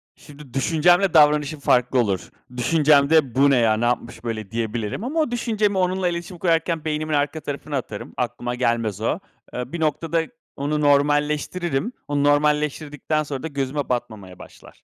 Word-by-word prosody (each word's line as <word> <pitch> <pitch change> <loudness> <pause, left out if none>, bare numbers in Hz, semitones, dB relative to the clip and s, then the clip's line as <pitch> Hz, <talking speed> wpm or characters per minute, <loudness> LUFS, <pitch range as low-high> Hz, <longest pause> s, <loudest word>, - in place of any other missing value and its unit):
Şimdi 140 -3 -15
düşüncemle 175 +6 +3
davranışım 150 -1 +4
farklı 125 -1 +2
olur. 100 -6 -1 0.3
Düşüncemde, 145 0 +3
"Bu 140 +2 +5
ne 135 - +4
ya, 110 -2 +3
ne 120 - 0
yapmış 120 0 -2
böyle?" 110 -4 -5
diyebilirim 115 - -3
ama 300 +6 -2
o 305 -6 +1
düşüncemi 215 -4 0
onunla 185 0 +1
iletişim 175 +1 -4
kurarken 165 -2 0
beynimin 155 0 -2
arka 145 +2 0
tarafına 145 0 -4
atarım. 110 -5 -7
Aklıma 120 0 -3
gelmez 115 -4 -1
o. 115 +9 0 0.3
Eee, 125 +1 -5
bir 170 - -3
noktada 160 +1 0 0.3
onu 150 +2 -1
normalleştiririm. 145 - +1 0.2
Onu 145 -1 0
normalleştirdikten 150 +1 +1
sonra 140 -1 -6
da - - -2
gözüme 140 -1 -3
batmamaya 105 -7 -4
başlar. - - -15
145 Hz, 155 wpm, -22 LUFS, 125-160 Hz, 0.3 s, Bu